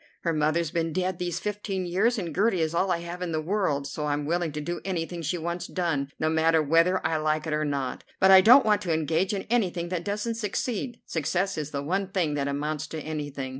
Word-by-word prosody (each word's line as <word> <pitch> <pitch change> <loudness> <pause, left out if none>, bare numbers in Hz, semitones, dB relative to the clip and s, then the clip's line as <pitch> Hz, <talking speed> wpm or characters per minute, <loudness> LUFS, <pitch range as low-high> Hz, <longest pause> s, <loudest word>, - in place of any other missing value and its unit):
Her 165 - 0
mother's 155 +1 +1
been 165 -1 -1
dead 185 0 -1
these 175 -1 -2
fifteen 205 -2 -3
years, 205 +8 +1
and 170 -6 -4
Gertie 195 -3 +2
is 160 0 0
all 185 +3 +1
I 170 -2 0
have 170 +1 -7
in 180 -2 -2
the 160 - 0
world, 155 -5 0
so 150 +2 -4
I'm 145 0 -1
willing 170 +1 0
to 150 - -3
do 175 +4 -4
anything 175 -2 -3
she 165 +3 -1
wants 170 +1 -4
done, 160 -7 -1
no 155 - +1
matter 160 +1 +3
whether 165 +5 +3
I 160 - +1
like 155 0 0
it 160 - -2
or 150 0 0
not. 140 -3 -3 0.2
But 190 0 +6
I 190 0 +10
don't 250 +6 +7
want 210 -1 +3
to 170 -3 -1
engage 160 +4 0
in 200 -2 -2
anything 180 -7 0
that 175 -1 -2
doesn't 210 +4 -2
succeed. 230 +2 -3
Success 180 +5 -1
is 150 -2 -4
the 140 -1 -4
one 190 +6 -1
thing 180 -6 0
that 140 -1 -1
amounts 150 +2 -2
to 160 - -6
anything. 145 -3 -4
170 Hz, 235 wpm, -27 LUFS, 155-190 Hz, 0.2 s, I